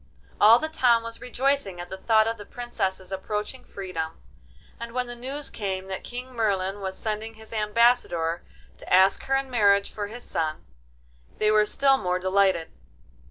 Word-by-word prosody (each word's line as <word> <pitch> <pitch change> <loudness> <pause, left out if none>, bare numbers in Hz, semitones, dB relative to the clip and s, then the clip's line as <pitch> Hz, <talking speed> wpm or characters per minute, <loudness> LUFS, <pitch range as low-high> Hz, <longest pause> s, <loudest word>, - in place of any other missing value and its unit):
All 220 +3 +8
the 315 - -2
town 245 -7 +3
was 230 0 -8
rejoicing 250 -6 0
at 175 +1 -8
the 190 - -5
thought 220 +2 +4
of 230 0 -2
the - - -7
Princess's 195 -6 -3
approaching 210 +6 -4
freedom, 180 -5 -5 0.6
and 235 0 -7
when 250 0 -1
the 240 0 -7
news 270 +4 -5
came 190 -2 -4
that 190 - -4
King 250 +1 -7
Merlin 200 -3 -1
was 190 -1 -4
sending 220 +1 -4
his 220 +1 -13
ambassador 210 -7 +2 0.4
to - - -11
ask 190 +1 +5
her 270 - +1
in 270 -1 -1
marriage 200 -4 +3
for 205 -1 -4
his 240 +4 -8
son, 155 -1 -2 0.7
they 215 0 +2
were 215 0 +4
still 275 +3 +4
more 180 -6 -1
delighted. 185 -2 +1
215 Hz, 170 wpm, -26 LUFS, 190-240 Hz, 0.7 s, All